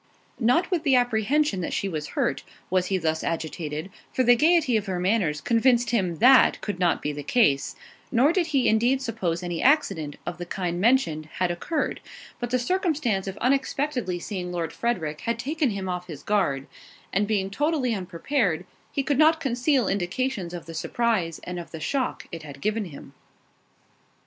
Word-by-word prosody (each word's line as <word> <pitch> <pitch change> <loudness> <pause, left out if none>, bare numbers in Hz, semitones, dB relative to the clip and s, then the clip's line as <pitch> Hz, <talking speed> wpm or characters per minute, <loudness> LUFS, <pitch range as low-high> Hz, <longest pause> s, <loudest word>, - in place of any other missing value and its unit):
Not 270 +11 +2
with 350 -4 +1
the 280 -5 +3
apprehension 245 0 +2
that 170 - -3
she 200 - -1
was 155 -5 -4
hurt, 135 - +1 0.3
was 185 -1 +2
he 190 - +1
thus 160 -2 -1
agitated, 160 +1 -4 0.2
for 255 - +1
the 245 0 +6
gaiety 310 -2 +3
of 210 -2 0
her 185 -2 -2
manners 180 -6 +1
convinced 240 +1 +3
him 185 -7 +1
that 255 - +6
could 205 -4 -4
not 175 -2 +1
be 150 - -1
the 145 0 -6
case, 145 - +2 0.4
nor 270 +7 +4
did 350 -3 +1
he 275 -5 +2
indeed 240 +5 +3
suppose 185 -8 -2
any 175 -2 -3
accident, 170 - +2
of 175 0 -5
the 175 - -4
kind 175 -1 -2
mentioned, 195 - +2
had 180 -1 0
occurred; 240 - -2 0.4
but 240 - -3
the 255 - +2
circumstance 275 - 0
of 195 - -5
unexpectedly 260 -5 0
seeing 180 0 -5
Lord 170 -3 -3
Frederick 160 -11 -2
had 230 0 -1
taken 290 +3 0
him 195 -3 -4
off 180 -1 -4
his 155 -5 -9
guard, 140 -10 0 0.5
and 200 +2 +2
being 195 -3 0
totally 290 0 0
unprepared, 180 - -1 0.3
he 275 - -1
could 285 0 0
not 320 +1 +5
conceal 260 -3 +1
indications 195 +1 -1
of 175 -1 -7
the 165 - -9
surprise, 180 0 -1
and 180 0 -5
of 170 - -8
the 160 - -8
shock 260 - -2
it 165 - -6
had 145 -2 -10
given 215 +6 -1
him. 140 -4 -11
205 Hz, 180 wpm, -25 LUFS, 175-255 Hz, 0.5 s, the